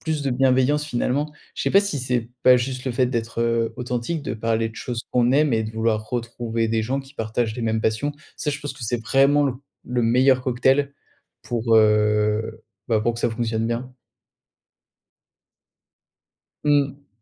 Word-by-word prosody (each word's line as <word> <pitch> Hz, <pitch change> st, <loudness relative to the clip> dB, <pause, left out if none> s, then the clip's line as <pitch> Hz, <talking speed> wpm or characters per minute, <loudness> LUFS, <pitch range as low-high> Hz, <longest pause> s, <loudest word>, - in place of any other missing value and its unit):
plus 155 Hz, -2 st, -2 dB
de 135 Hz, -, -1 dB
bienveillance 130 Hz, +3 st, +2 dB
finalement. 145 Hz, +2 st, -1 dB, 0.2 s
Je -, -, -4 dB
sais -, -, 0 dB
pas 195 Hz, -, +6 dB
si 200 Hz, -8 st, -2 dB
c'est 125 Hz, -2 st, -1 dB
pas 130 Hz, 0 st, +7 dB
juste 130 Hz, +1 st, -3 dB
le 130 Hz, -, -1 dB
fait 125 Hz, +1 st, +2 dB
d'être, 115 Hz, -2 st, -3 dB
heu, 115 Hz, -1 st, +1 dB
authentique, 125 Hz, +6 st, -3 dB
de 110 Hz, -, -3 dB
parler 115 Hz, 0 st, 0 dB
de 110 Hz, -, -13 dB
choses 120 Hz, -2 st, -5 dB
qu'on 120 Hz, -1 st, +3 dB
aime 145 Hz, +1 st, +3 dB
et 110 Hz, -1 st, +2 dB
de 110 Hz, -, -5 dB
vouloir 110 Hz, -1 st, -1 dB
retrouver 115 Hz, -1 st, -2 dB
des 110 Hz, 0 st, 0 dB
gens 130 Hz, +5 st, -1 dB
qui 135 Hz, +2 st, -16 dB
partagent 110 Hz, -1 st, -2 dB
les 120 Hz, -, -5 dB
mêmes 110 Hz, 0 st, 0 dB
passions. 110 Hz, +7 st, 0 dB, 0.3 s
Ça 150 Hz, -, -2 dB
je 145 Hz, -, -3 dB
pense 145 Hz, -2 st, -5 dB
que 130 Hz, -, -12 dB
c'est 120 Hz, +1 st, -1 dB
vraiment 140 Hz, +5 st, +3 dB
le 135 Hz, -, +1 dB, 0.4 s
le 125 Hz, -1 st, 0 dB
meilleur 130 Hz, +3 st, +4 dB
cocktail 130 Hz, +3 st, +2 dB, 0.5 s
pour 115 Hz, -1 st, +1 dB
heu, 105 Hz, +1 st, +2 dB, 0.2 s
bah 110 Hz, -2 st, +2 dB
pour 120 Hz, +2 st, 0 dB
que 115 Hz, -, -6 dB
ça -, -, +1 dB
fonctionne 115 Hz, -1 st, -1 dB
bien. 125 Hz, +2 st, -4 dB, 2.7 s
Mmh. 145 Hz, -1 st, +1 dB
120 Hz, 180 wpm, -23 LUFS, 115-135 Hz, 2.7 s, pas